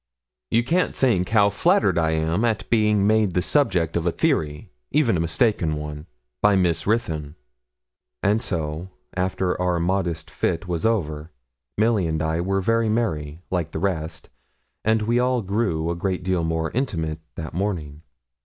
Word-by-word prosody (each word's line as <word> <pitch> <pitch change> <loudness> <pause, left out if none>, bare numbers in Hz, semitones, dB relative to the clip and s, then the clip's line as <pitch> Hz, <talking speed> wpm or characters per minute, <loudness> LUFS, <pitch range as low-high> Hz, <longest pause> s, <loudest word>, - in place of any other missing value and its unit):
'You 115 - +3
can't 170 +8 +1
think 105 -9 +2
how 105 -2 +4
flattered 105 - +3
I 80 -1 +2
am 80 +6 0
at 115 -2 0
being 105 -3 +3
made 105 -3 +2
the 90 - +3
subject 90 - +1
of 85 0 0
a - - +3
theory, 75 -2 -1 0.2
even 135 -8 +2
a - - 0
mistaken 85 -1 +1
one, 75 +1 -6 0.3
by 105 -1 +5
Miss 90 -3 +1
Ruthyn.' 80 -9 -1 0.9
And 105 +3 +3
so, 80 0 -3 0.3
after 90 0 -1
our 90 -1 +1
modest 85 -2 -1
fit 90 +3 -1
was 85 +3 0
over, 80 -8 -1 0.5
Milly 105 -4 +2
and 80 -1 -1
I 80 +1 0
were 95 +2 0
very 115 +3 +2
merry, 80 -8 -2
like 85 -3 -1
the - - -2
rest, 80 -4 -3 0.5
and 110 0 +2
we 120 +3 +2
all 125 -2 +1
grew 95 -5 0
a - - -2
great 90 +1 -2
deal 90 -2 0
more 80 0 -1
intimate 80 - -2 0.2
that 80 - -6
morning. 80 -6 -3
90 Hz, 165 wpm, -23 LUFS, 80-110 Hz, 0.9 s, by